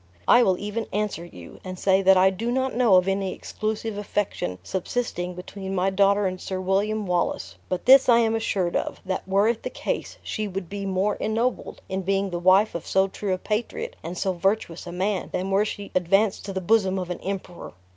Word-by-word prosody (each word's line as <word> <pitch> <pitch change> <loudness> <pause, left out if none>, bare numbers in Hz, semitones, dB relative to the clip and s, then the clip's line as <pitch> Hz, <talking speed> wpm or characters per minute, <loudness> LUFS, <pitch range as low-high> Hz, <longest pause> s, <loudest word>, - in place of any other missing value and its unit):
I 245 - +7
will 190 -6 +3
even 210 +3 -4
answer 210 -4 -2
you, 90 - -12
and 185 -1 -6
say 190 +1 +3
that 190 0 +6
I 190 +1 +5
do 220 +5 -3
not 260 +1 0
know 235 -5 +4
of 185 0 +4
any 195 -1 -1
exclusive 215 0 -4
affection 195 - -2
subsisting 180 - -3
between 190 +1 -6
my 190 +1 +1
daughter 200 +1 +3
and 185 -1 -2
Sir 190 -1 -4
William 200 +3 0
Wallace; 175 - -1 0.2
but 185 -1 -3
this 265 0 +7
I 235 - +7
am 225 -1 +3
assured 195 -6 -1
of, - - -2
that 190 0 -3
were 195 +2 +3
it 230 -1 0
the - - -4
case, - - -4
she 215 -1 -3
would 190 -3 -5
be 200 0 -4
more 195 +2 0
ennobled 230 +3 -2
in 190 0 -2
being 195 +1 0
the 175 - -2
wife 190 +4 +4
of 170 - -6
so 190 0 +3
true 195 0 -3
a - - -7
patriot 215 +4 -3
and 170 +3 -6
so 190 - 0
virtuous 180 -1 -1
a - - -5
man, 190 +2 -1
than 190 +2 -2
were 200 +2 +3
she 205 -1 -6
advanced 195 +3 +2
to 195 - -5
the 190 - -2
bosom 190 0 +2
of 180 -1 -3
an 180 - -4
emperor. 190 -2 -6
195 Hz, 215 wpm, -25 LUFS, 185-210 Hz, 0.2 s, I